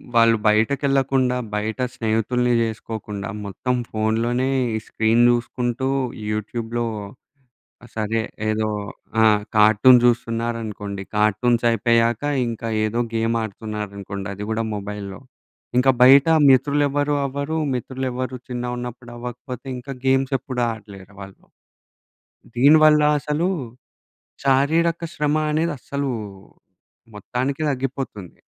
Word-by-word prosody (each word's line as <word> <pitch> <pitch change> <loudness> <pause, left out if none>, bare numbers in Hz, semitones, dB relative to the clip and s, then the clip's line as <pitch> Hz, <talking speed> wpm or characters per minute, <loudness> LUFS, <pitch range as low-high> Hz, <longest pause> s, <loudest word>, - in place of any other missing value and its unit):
వాళ్ళు 115 -1 +5
బయటకెళ్ళకుండా 135 +3 +2 0.2
బయట 110 +3 -3
స్నేహితుల్ని 120 +2 0
జేసుకోకుండా 110 -2 -4 0.2
మొత్తం 125 +6 -2 0.2
ఫోన్‌లోనే 115 +4 0 0.3
ఈ - - +1
స్క్రీన్ 115 +2 +2
చూసుకుంటూ 120 +1 -1 0.4
యూట్యూబ్‌లో, 115 +2 -3 1.1
సరే 110 +1 -1 0.3
ఏదో 110 0 0 0.5
ఆ! - - +6 0.3
కార్టూన్ 110 +4 +7
చూస్తున్నారనుకోండి. 115 -4 -1
కార్టూన్స్ 115 +3 +2
అయిపోయాక 115 +1 +2 0.2
ఇంకా 115 0 -4 0.2
ఏదో 115 +3 -1
గేమ్ 115 +1 0
ఆడుతున్నారనుకోండి. 100 -2 -6
అది 100 +1 -7
గూడా 115 +1 0
మొబైల్లో. 100 -1 -6 0.6
ఇంకా 135 +1 +5
బయట 135 +4 +7 0.2
మిత్రులెవరు 145 +2 +2
అవ్వరు. 140 +4 -3 0.2
మిత్రులెవరూ 130 0 -3
చిన్నగున్నప్పుడవ్వకపోతే, 125 0 -6
ఇంకా 125 +3 -8
గేమ్సెప్పుడు 130 -1 0
ఆడలేరు 100 -3 -11
వాళ్ళు. 95 0 -12 1.1
దీనివల్ల 150 +4 +6 0.2
అసలు 150 +4 -1 1.0
శారీరక 160 +5 +2
శ్రమ 150 0 0
అనేది 160 +2 0
అస్సలు 140 +2 -3 1.0
మొత్తానికి 130 +8 -3
తగ్గిపోతుంది. 130 -8 -5
120 Hz, 90 wpm, -22 LUFS, 110-135 Hz, 1.1 s, కార్టూన్